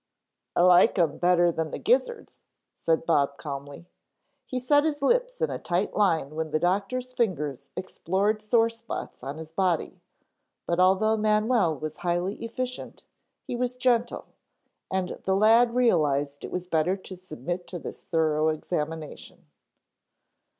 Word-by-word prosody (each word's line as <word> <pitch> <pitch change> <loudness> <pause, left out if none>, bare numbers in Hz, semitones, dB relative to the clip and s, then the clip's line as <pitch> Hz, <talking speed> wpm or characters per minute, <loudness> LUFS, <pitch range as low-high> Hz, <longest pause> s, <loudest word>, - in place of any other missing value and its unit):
"I - - +3
like 180 +5 +6
'em 165 -5 +1
better 175 -1 +4
than 160 -1 -3
the - - -5
gizzards," 480 0 0 0.4
said 165 0 +1
Bob 140 -4 +2
calmly. 140 +1 -7 0.6
He 255 - -3
set 290 +4 +3
his 295 -2 -2
lips - - +1
in 475 - +1
a - - -4
tight 180 +3 -1
line 165 -8 +1
when 160 0 -3
the 155 - +1
doctor's 200 +9 -1
fingers 155 - -2
explored 195 +4 -1
sore 225 +2 +3
spots 230 0 -7
on 135 +4 -6
his 160 0 -9
body, 180 -1 -1 0.6
but 170 +1 -1
although 195 +4 +4
Manwell 215 - +2
was 155 0 -5
highly 175 +3 -1
efficient 250 +2 -5 0.4
he - - -5
was 250 +1 -2
gentle 240 -2 +1 0.6
and 190 -1 -2
the 190 - +1
lad 230 +4 +5
realized 145 - +1
it - - -5
was 180 0 -3
better 180 +2 +1
to 190 0 -10
submit 175 -1 -6
to 180 - -6
this - - -9
thorough 155 -2 +1
examination. 155 0 -4
185 Hz, 145 wpm, -26 LUFS, 160-230 Hz, 0.6 s, like